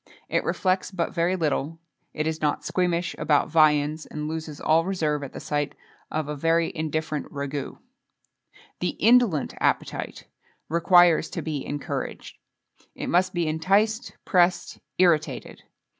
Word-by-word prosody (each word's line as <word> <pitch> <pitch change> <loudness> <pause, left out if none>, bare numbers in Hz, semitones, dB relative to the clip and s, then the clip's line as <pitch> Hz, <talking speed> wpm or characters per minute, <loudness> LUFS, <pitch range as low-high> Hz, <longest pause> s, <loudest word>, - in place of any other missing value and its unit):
It - - +1
reflects 185 0 0
but 180 -3 -3
very 175 +1 +1
little; 160 -2 -1 0.3
is 155 +1 -2
not 150 -1 0
squeamish 175 -1 0
about 150 -2 +2
viands, 155 -1 +3
and 150 0 -5
loses 155 -1 -5
all 160 +1 +3
reserve 160 -6 -1
at 140 - -7
the - - -8
sight 145 -1 -2 0.3
of 155 -2 -2
a 150 - -3
very 165 +3 +1
indifferent 155 -1 -3
ragoût. 140 -1 -4 1.0
The 180 - -2
indolent 230 - +3
appetite - - -1 0.4
requires 170 0 +5
to - - -5
be 150 -4 -3
encouraged. 145 -1 -5 0.6
It - - -5
must 180 +2 +3
be 170 -2 0
enticed, 200 +8 +1
pressed, 180 -2 +2 0.2
irritated. 170 -4 +1
160 Hz, 130 wpm, -25 LUFS, 150-175 Hz, 1.0 s, requires